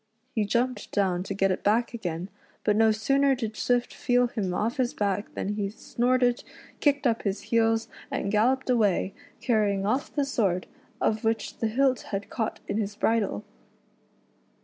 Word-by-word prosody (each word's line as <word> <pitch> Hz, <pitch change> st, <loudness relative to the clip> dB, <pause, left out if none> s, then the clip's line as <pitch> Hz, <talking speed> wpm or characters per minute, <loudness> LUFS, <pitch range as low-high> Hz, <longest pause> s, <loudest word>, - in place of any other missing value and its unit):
He 215 Hz, -2 st, +1 dB
jumped 235 Hz, +1 st, -1 dB
down 185 Hz, -3 st, +1 dB
to 195 Hz, -, -4 dB
get 195 Hz, -1 st, +2 dB
it 185 Hz, -, -2 dB
back 230 Hz, +4 st, +2 dB
again, 180 Hz, -5 st, -4 dB, 0.3 s
but 210 Hz, -, +3 dB
no 225 Hz, +1 st, +5 dB
sooner 275 Hz, +6 st, +2 dB
did 225 Hz, -4 st, -4 dB
Swift 245 Hz, +1 st, 0 dB
feel 245 Hz, 0 st, +2 dB
him 205 Hz, -6 st, -2 dB
off 225 Hz, +8 st, -1 dB
his 250 Hz, -2 st, 0 dB
back 205 Hz, 0 st, -1 dB
than -, -, -2 dB
he 205 Hz, -1 st, -1 dB
snorted, 245 Hz, +3 st, +1 dB, 0.4 s
kicked 285 Hz, -1 st, +2 dB
up 230 Hz, -2 st, +2 dB
his 200 Hz, -1 st, -2 dB
heels, 225 Hz, 0 st, +3 dB, 0.2 s
and 200 Hz, -, -2 dB
galloped 250 Hz, +6 st, +2 dB
away, 205 Hz, -5 st, +2 dB, 0.3 s
carrying 205 Hz, -5 st, +1 dB
off 255 Hz, +7 st, 0 dB
the 285 Hz, -2 st, 0 dB
sword, 195 Hz, -9 st, 0 dB, 0.3 s
of 215 Hz, +1 st, 0 dB
which 225 Hz, -1 st, -1 dB
the 225 Hz, -, +1 dB
hilt 260 Hz, +3 st, +2 dB
had 200 Hz, 0 st, -4 dB
caught 220 Hz, -3 st, -2 dB
in 210 Hz, -, -1 dB
his 205 Hz, -1 st, -2 dB
bridle. 215 Hz, -, 0 dB
220 Hz, 170 wpm, -27 LUFS, 200-245 Hz, 0.4 s, no